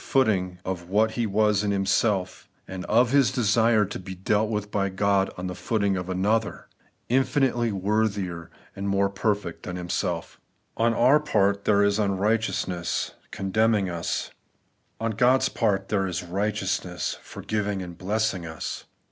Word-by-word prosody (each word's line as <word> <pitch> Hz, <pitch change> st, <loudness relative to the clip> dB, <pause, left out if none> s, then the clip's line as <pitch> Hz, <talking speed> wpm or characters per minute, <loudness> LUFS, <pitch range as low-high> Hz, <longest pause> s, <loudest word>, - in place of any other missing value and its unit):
footing 95 Hz, -9 st, +1 dB
of 90 Hz, -2 st, -4 dB
what 110 Hz, +3 st, +3 dB
he 115 Hz, 0 st, -1 dB
was 105 Hz, 0 st, +2 dB
himself, 100 Hz, -2 st, 0 dB, 0.2 s
and 95 Hz, -1 st, -6 dB
of 120 Hz, +3 st, +3 dB
his 140 Hz, -3 st, +4 dB
desire 115 Hz, -2 st, +3 dB
to 100 Hz, -, -6 dB
be 95 Hz, 0 st, -8 dB
dealt 105 Hz, +3 st, +1 dB
with 105 Hz, -1 st, -3 dB
by 100 Hz, -1 st, 0 dB
God 100 Hz, 0 st, +1 dB
on 90 Hz, -, -5 dB
the 90 Hz, -, -3 dB
footing 100 Hz, 0 st, 0 dB
of 90 Hz, 0 st, -4 dB
another, 105 Hz, +4 st, 0 dB, 0.4 s
infinitely 130 Hz, -2 st, +2 dB
worthier 100 Hz, -4 st, -1 dB, 0.3 s
and 100 Hz, 0 st, -3 dB
more 100 Hz, 0 st, +2 dB
perfect 100 Hz, -3 st, -2 dB
than 90 Hz, -, -6 dB
himself 90 Hz, -1 st, -3 dB, 0.3 s
On 115 Hz, +1 st, +2 dB
our 130 Hz, +5 st, +5 dB
part 100 Hz, -9 st, +1 dB
there 100 Hz, -1 st, +4 dB
is 100 Hz, +1 st, +2 dB
unrighteousness, 100 Hz, -3 st, 0 dB, 0.2 s
condemning 100 Hz, 0 st, +1 dB
us; 85 Hz, -1 st, -3 dB, 0.7 s
on 115 Hz, 0 st, -1 dB
God's 125 Hz, +4 st, +3 dB
part 100 Hz, -4 st, 0 dB
there 95 Hz, -2 st, +1 dB
is 90 Hz, -1 st, -3 dB
righteousness, 95 Hz, -1 st, -2 dB
forgiving 105 Hz, -2 st, -3 dB
and 90 Hz, -1 st, -8 dB
blessing 100 Hz, 0 st, -1 dB
us. 80 Hz, -1 st, -6 dB
100 Hz, 145 wpm, -25 LUFS, 95-110 Hz, 0.7 s, our